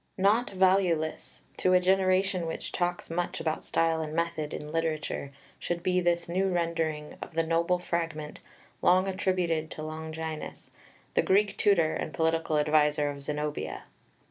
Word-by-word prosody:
Not 210 +6 +3
valueless, 185 -4 +1
to 185 - +2
a 180 - +7
generation 185 -1 +2
which 165 - -5
talks 175 -1 -2
much 175 +1 -2
about 160 -1 -2
style 165 -1 +1
and 155 0 -4
method 165 -2 -1
in 150 0 -6
literature, 155 -3 -2 0.3
should 175 0 -3
be 180 0 +2
this 170 -1 +1
new 185 +3 +1
rendering 165 -4 -1
of - - -8
the 165 - +2
noble 170 +2 +2
fragment, 165 -4 -3 0.4
long 185 +2 +4
attributed 180 -4 0
to 155 - -7
Longinus, 160 0 -6 0.4
the - - +4
Greek 200 +1 +2
tutor 170 -6 +3
and 155 - -4
political 160 0 +1
adviser 150 -1 +3
of 140 0 -9
Zenobia. 150 +1 -3
165 Hz, 145 wpm, -29 LUFS, 155-180 Hz, 0.4 s, a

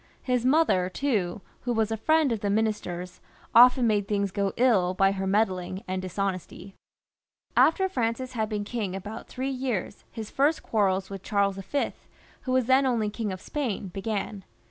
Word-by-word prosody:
His 250 -2 0
mother, 255 - +3
too, 200 -6 -1 0.2
who 245 - -2
was 225 -1 0
a - - +1
friend 310 +5 +2
of 225 - -1
the 205 - -2
minister's, 200 -4 -2 0.3
often 250 +1 +7
made 205 -3 +1
things 200 -2 0
go 200 0 0
ill 200 -8 +3
by 195 +1 +4
her 195 -1 -3
meddling 190 -1 0
and 185 0 -2
dishonesty. 190 +1 -4 0.8
After 380 +4 +4
Francis 255 -5 -2
had 220 -3 -1
been 210 -2 -2
king 205 -4 -3
about 205 +3 -7
three 265 +2 -3
years, 255 -7 -3
his 220 -2 -7
first 295 +4 +2
quarrels 195 -3 0
with 195 -2 -6
Charles 200 -1 0
V. 235 +9 -2 2.0
began. 200 0 -3
210 Hz, 145 wpm, -27 LUFS, 195-245 Hz, 2.0 s, often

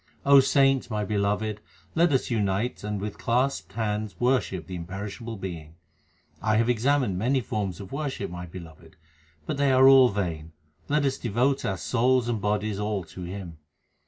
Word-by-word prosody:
saints, 135 -2 +3
my 105 -2 -2
beloved, 105 +1 -1 0.3
let 170 0 +3
us 130 -2 0
unite 105 +1 -1
and 105 -1 -3
with 105 +1 -5
clasped 125 -3 0
hands 105 -1 -3
worship 120 - 0
the 95 - -9
Imperishable 100 +6 -6
Being. 85 -5 -7 0.6
1 110 0 +1
have 115 +1 +2
examined 125 -4 +1
many 130 +6 +2
forms 100 -6 -3
of 100 -2 -9
worship, 135 - -4
my 90 0 -7
beloved; 85 -2 -12 0.5
but - - -3
they 140 -1 +3
are 130 0 +6
all 135 -2 +8
vain; 80 -6 -4 0.4
let 145 0 +2
us 135 -1 -1
devote 125 +4 0
our 95 -2 -1
souls 120 +10 +1
and 115 -3 -1
bodies 105 0 -1
all 105 -2 -2
to 85 +3 -11
Him. 90 -3 -7
105 Hz, 160 wpm, -26 LUFS, 95-125 Hz, 0.6 s, all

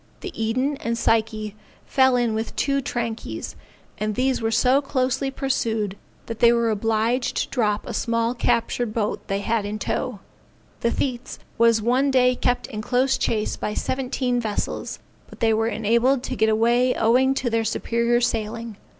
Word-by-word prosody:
The 380 - -6
Eden 255 +6 -1
and 230 -3 -2
Psyche 220 -2 0 0.3
fell 260 -1 +3
in 240 -2 +1
with 220 +1 -3
two 275 0 +1
trankies, 235 -4 -4 0.4
and 215 0 -1
these 260 +1 +1
were 225 - 0
so 250 +5 +3
closely 265 0 0
pursued 225 -7 -1 0.3
that 230 -1 -6
they 235 - +6
were 235 -1 +2
obliged 225 +4 0
to - - -1
drop 210 -4 0
a - - -5
small 230 0 0
captured 240 -2 0
boat 215 -2 -2
they 195 0 -1
had 225 0 0
in 205 +1 -4
tow. 245 0 -3 0.6
The 235 - +1
Thetes 250 0 -3 0.2
one 235 +4 +3
day 250 -1 +4
kept 245 0 0
in 215 - -6
close 255 +4 +2
chase 215 -1 -1
of 210 - -2
seventeen 255 -1 -1
vessels, 215 -3 -3 0.3
but - - -14
they 225 -2 +3
were 225 +1 +1
enabled 235 +4 +2
to 260 - -3
get 220 -1 +2
away 240 +3 +3
owing 255 +4 +3
to 250 -3 -1
their 225 0 +1
superior 235 +2 +1
sailing. 230 -1 -2
235 Hz, 165 wpm, -23 LUFS, 220-255 Hz, 0.6 s, they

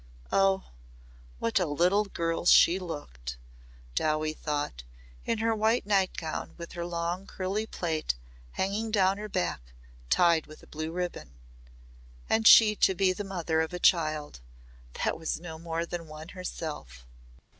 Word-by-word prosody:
Oh! 195 -1 +2 0.7
What 115 - +1
a 180 - 0
little 180 +8 +2
girl 170 -3 -2
she 180 +1 +7
looked, 60 - -7 0.6
Dowie 155 - 0
thought, 145 - -3 0.4
in 230 - 0
her 225 +1 +1
white 220 +2 +1
night 195 -2 +1
gown 160 -2 -5
with 170 -1 -8
her 170 -1 -4
long 175 +2 -3
curly 195 +4 -3
plait 160 - -2 0.4
hanging 205 +4 -1
down 195 -2 +2
her 215 0 -6
back 80 - -1 0.5
tied 170 - +4
with 155 - -14
a - - -13
blue 155 +1 -5
ribbon! 170 - -5 0.9
And 220 0 +3
she 215 -2 +9
to 190 - +3
be 185 0 +3
the 205 - -5
mother 170 -5 -1
of 160 +2 -3
a 180 - -3
child 155 - +2 0.7
that - - 0
was 160 - -2
no 160 -2 -8
more 165 0 -3
than 170 -1 -6
one 155 +2 -10
herself! 150 - -7
170 Hz, 150 wpm, -29 LUFS, 155-195 Hz, 0.9 s, she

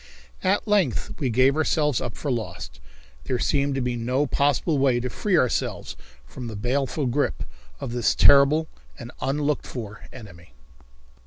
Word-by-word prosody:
At 195 +3 +1
length 210 -2 +1
we 135 -5 0
gave 130 +4 +3
ourselves 150 -3 +1
up 120 - -5
for 145 - -3
lost. 110 - -5 0.5
There 125 - -1
seemed 140 +2 0
to 135 - -1
be 125 -1 -1
no 125 +5 0
possible 145 +2 +1
way 130 -3 +3
to 125 0 -4
free 200 -5 0
ourselves 125 -6 -1 0.3
from 125 - -8
the 110 - -6
baleful 135 +6 -1
grip 135 +4 -1 0.4
of - - -5
this 120 -1 +1
terrible 145 +3 +5 0.3
and 120 - -9
unlooked 145 +1 -1
for 105 -4 -8
enemy. 90 -8 -13
135 Hz, 155 wpm, -24 LUFS, 120-145 Hz, 0.5 s, terrible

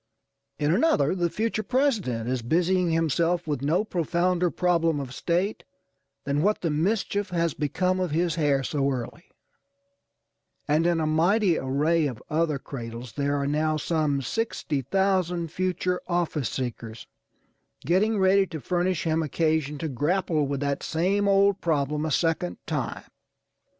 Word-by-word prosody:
In 150 +2 +1
another 185 - +3
the 175 -2 0
future 220 +3 -1
President 215 - 0
is 130 -1 -1
busying 175 +7 +1
himself 165 +2 +1
with 145 -5 -2
no 160 +8 +1
profounder 175 0 0
problem 165 -3 +1
of 130 -2 -6
state 180 +8 -1 0.6
than 140 +1 0
what 210 +5 +1
the 165 - 0
mischief 200 +5 0
has 170 -3 0
become 180 +6 0
of 180 -1 0
his 165 +2 0
hair 145 -4 +1
so 140 0 0
early; 135 +5 -5 1.4
and 155 +3 +2
in 170 -1 +2
a 160 - 0
mighty 175 +5 +3
array 150 +4 +1
of 125 -5 -6
other 155 -2 +1
cradles 120 -3 -7
there 140 +3 0
are 140 - -1
now 155 +2 +1
some 150 -3 0
60,000 180 - -1
future 180 0 -1
office 170 -6 -1
seekers, 115 -3 -5 0.8
getting 205 +6 +2
ready 190 0 +4
to 160 - -6
furnish 175 +4 -1
him 160 0 +1
occasion 155 -1 0
to 160 - -3
grapple 155 +2 0
with 140 0 -3
that 140 -1 -1
same 195 +5 0
old 200 0 +3
problem 150 -1 0
a - - -3
second 165 +3 0
time. 145 -7 -3
165 Hz, 145 wpm, -26 LUFS, 145-180 Hz, 1.4 s, ready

